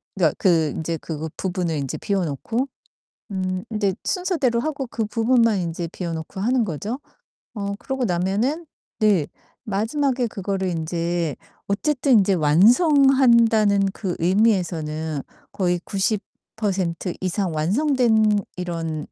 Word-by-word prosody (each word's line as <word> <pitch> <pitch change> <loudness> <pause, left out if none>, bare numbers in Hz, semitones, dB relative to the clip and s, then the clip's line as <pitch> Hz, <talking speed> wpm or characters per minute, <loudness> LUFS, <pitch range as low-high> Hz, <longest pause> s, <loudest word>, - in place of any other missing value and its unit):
그러니까 165 -6 +2
그 165 -5 +3
인제 165 +1 -2
그 160 -1 -5
부분을 180 -3 -2
인제 135 -2 -3
비워 195 -2 -1
놓고 225 - -2 0.7
음 185 -1 -2
인제 205 -3 0
순서대로 325 -11 0
하고 280 -1 -2
그 225 -2 -2
부분만 230 -1 +2
인제 170 0 -3
비워 170 -3 -4
놓고 160 +4 -6
하는 240 +4 +2
거죠. 205 - -4 0.6
어 200 -1 -3
그러고 265 -2 -3
나면은 205 - 0 0.3
네. 200 -8 +3 0.4
마지막에 245 +5 0
그거를 195 -2 -2
인제 170 -1 -2 0.3
어쨌든 265 +6 +1
인제 195 0 +2
완성한다는 230 - +5
그 190 -5 -4
의미에서는 165 -6 +1 0.3
거의 180 -2 0
90% 195 -3 -2
이상 185 -1 -1
완성된 220 - +2 0.2
이런 165 -4 -4
195 Hz, 255 characters per minute, -22 LUFS, 170-230 Hz, 0.7 s, 완성한다는